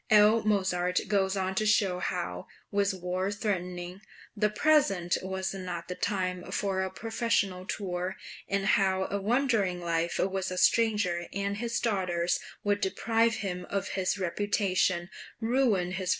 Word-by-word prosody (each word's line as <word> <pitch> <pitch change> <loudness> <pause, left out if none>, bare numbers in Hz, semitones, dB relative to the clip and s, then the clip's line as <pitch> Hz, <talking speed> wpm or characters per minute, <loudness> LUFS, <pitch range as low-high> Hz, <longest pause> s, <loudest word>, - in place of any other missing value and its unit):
L. 215 +1 +6
Mozart 185 -4 +1
goes 195 -1 +1
on 190 0 -1
to 205 - 0
show 195 -4 +3
how, 90 - -3 0.2
with 200 0 +2
war 185 +1 -2
threatening, 180 -3 -3 0.3
the 210 0 +2
present 210 - +3
was 190 0 -3
not 180 -3 -5
the - - -1
time 185 -1 -2
for 195 -2 0
a 190 - -1
professional 200 -3 -1
tour, 180 -2 -3 0.3
and 195 0 0
how 190 -1 +2
a 200 0 -1
wandering 220 -5 +1
life 170 0 -1
with 190 0 0
a 185 - -4
stranger 210 -6 +2
and 200 +1 -2
his 235 +1 -1
daughters 180 -5 0 0.2
would 205 0 +1
deprive 225 +4 +2
him 180 -5 -4
of 200 -1 -2
his 190 +1 0
reputation, 185 -2 0 0.3
ruin 225 -6 +2
his 180 - -3
{MANNHEIM. 185 - -4
190 Hz, 150 wpm, -29 LUFS, 180-210 Hz, 0.3 s, L